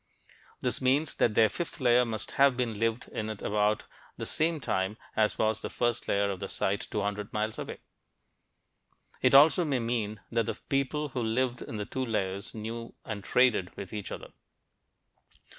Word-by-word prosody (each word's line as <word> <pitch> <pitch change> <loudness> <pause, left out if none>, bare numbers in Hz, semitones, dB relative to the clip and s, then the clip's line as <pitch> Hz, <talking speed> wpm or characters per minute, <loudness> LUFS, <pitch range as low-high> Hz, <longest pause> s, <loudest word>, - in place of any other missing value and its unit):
This - - 0
means 135 +4 +2
that 110 - +2
their 110 - +6
fifth 170 - -4
layer 125 -1 +5
must 110 -1 -3
have 135 -2 +4
been 115 -4 -1
lived 115 +1 0
in 110 -2 -4
at 110 -2 -6
about 105 +1 +1 0.3
the - - -4
same 160 0 +1
time 95 -4 -1 0.2
as 110 -1 +2
was 110 0 +1
the - - -4
first 120 -1 -1
layer 100 0 +2
in 95 - -5
the 100 - -5
site 100 +1 -1
200 105 0 -2
miles 110 +1 -2
away. - - -6 1.4
It 130 +1 +5
also 155 +6 +7
may 145 -5 0
mean 115 -3 -2
that 115 -2 +1
the - - -1
people 140 +2 0
who 130 -2 -3
lived 120 +2 0
in 110 - -6
the 105 - -3
two 130 +5 -3
layers 100 -5 -2
knew 115 +2 -6
and 105 -3 -5
traded 120 -8 +2
with 100 0 -7
each 105 -2 -5
other. - - -7
115 Hz, 175 wpm, -29 LUFS, 105-130 Hz, 1.4 s, also